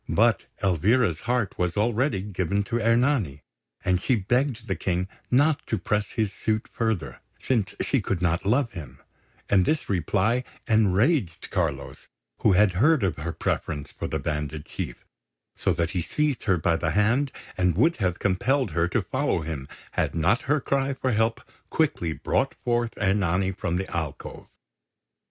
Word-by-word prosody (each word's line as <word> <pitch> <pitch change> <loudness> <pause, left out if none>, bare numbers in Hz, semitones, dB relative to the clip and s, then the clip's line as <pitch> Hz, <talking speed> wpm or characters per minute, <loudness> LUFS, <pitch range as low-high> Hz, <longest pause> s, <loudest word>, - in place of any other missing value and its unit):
But - - +3 0.2
Elvira's 95 - +2
heart 120 -5 0
was 90 +1 0
already 115 -1 +1
given 100 0 -1
to 120 +3 -2
Ernani, 115 - +2 0.4
and 90 -1 +2
she 130 - +2
begged 120 +3 0
the - - -1
King 90 0 -1 0.2
not 145 +4 +3
to 110 - 0
press 105 -1 -1
his 110 -4 0
suit 110 +3 -1
further, 110 -10 -2 0.2
since 115 -6 0
she 135 - +1
could 95 -2 -1
not 90 -1 +1
love 120 +4 +2
him; 70 -7 -9 0.5
and 95 -2 +4
this 155 - 0
reply 100 - +1 0.2
enraged 110 - +2
Carlos, - - -2 0.3
who - - +4
had 100 +1 +5
heard 140 - +3
of 95 -4 0
her 80 +3 -3
preference 75 -3 -3
for - - -5
the - - -2
bandit 75 0 -3
chief, - - -6 0.5
so - - 0
that 85 0 0
he 90 - -1
seized 150 - -1
her 95 -4 +3
by 85 +1 +2
the - - -1
hand, 120 +7 +2 0.2
and 90 -2 +2
would 160 +10 +3
have 90 -5 0
compelled 125 +8 +1
her 85 0 +1
to - - 0
follow - - 0
him, 75 -4 -5 0.2
had - - -1
not 90 +9 +2
her 145 +1 +4
cry 140 0 0
for 130 0 -1
help 115 +1 +1 0.3
quickly 85 -2 0
brought 130 +11 0
forth 120 -2 0
Ernani 95 -1 +1
from 90 -3 -3
the 95 +2 -2
alcove. 80 -4 -5
100 Hz, 165 wpm, -26 LUFS, 90-120 Hz, 0.5 s, had